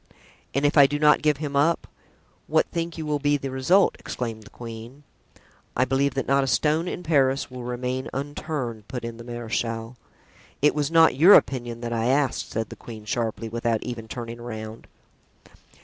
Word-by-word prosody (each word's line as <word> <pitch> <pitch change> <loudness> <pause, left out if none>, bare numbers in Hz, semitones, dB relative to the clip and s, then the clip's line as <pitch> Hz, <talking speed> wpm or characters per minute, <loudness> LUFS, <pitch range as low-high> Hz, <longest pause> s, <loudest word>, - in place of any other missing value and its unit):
"And 140 +1 +1
if 145 +1 +4
I 140 - +9
do 145 - -2
not 150 0 +5
give 150 -2 +2
him 145 -1 -4
up, 155 +4 +2 0.6
what - - +3
think 170 0 -3
you 160 - -4
will 150 -1 0
be 145 +1 +2
the 135 -1 -5
result?" 140 +10 +3
exclaimed 115 -3 -5
the 105 - -14
queen. 115 +4 -10 0.7
"I 130 - +4
believe 135 +2 +1
that 135 - -1
not 135 0 +3
a - - -2
stone 155 +5 +1
in 180 - -4
Paris 135 -4 +2
will 125 -1 -7
remain 125 +1 -3
unturned," 135 -6 -4
put 125 -2 -5
in 115 -1 -6
the 115 - -9
marechal. 115 0 -4 0.6
"It 150 +1 +4
was 150 -1 0
not 165 -4 +5
your 180 +8 +9
opinion 120 -3 +1
that 120 -1 -3
I 115 0 0
asked," 135 0 +1
said 110 -1 -3
the - - -8
queen, 110 -3 -10
sharply, 115 +1 -2
without 115 0 -1
even 120 -3 -6
turning 115 0 -6
around. 110 -2 -7
130 Hz, 185 wpm, -25 LUFS, 115-145 Hz, 0.7 s, I